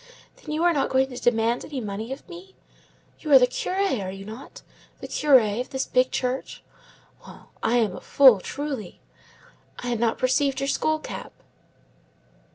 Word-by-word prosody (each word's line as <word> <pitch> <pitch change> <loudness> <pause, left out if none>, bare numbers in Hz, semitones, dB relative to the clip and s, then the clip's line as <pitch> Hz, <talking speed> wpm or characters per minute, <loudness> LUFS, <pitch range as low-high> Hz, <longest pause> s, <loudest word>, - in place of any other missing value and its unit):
Then 305 - -9
you 310 +2 -1
are 350 0 +4
not 280 - 0
going 265 0 +2
to 250 - -8
demand 235 0 +1
any 285 -3 -6
money 215 +1 -5
of 270 - -8
me? 365 +1 -12 0.6
You 305 - -5
are - - +11
the 250 - +6
curé, 365 - -1
are 185 - -5
you 195 +1 -8
not? 220 +6 -11 0.4
the - - -7
curé 245 -7 +3
of 250 - -7
this 265 0 -2
big 255 0 +2
church? 255 +1 -3 0.6
Well! - - -15
I 230 +2 +2
am 215 -6 +1
a - - -9
fool, 260 -7 +6
truly! 270 -3 -6 0.8
I 245 - -5
had 235 -2 -1
not 230 -1 +1
perceived 265 +1 +1
your 275 0 -1
skull 315 +2 +1
cap." 310 - -8
255 Hz, 175 wpm, -24 LUFS, 230-285 Hz, 0.8 s, are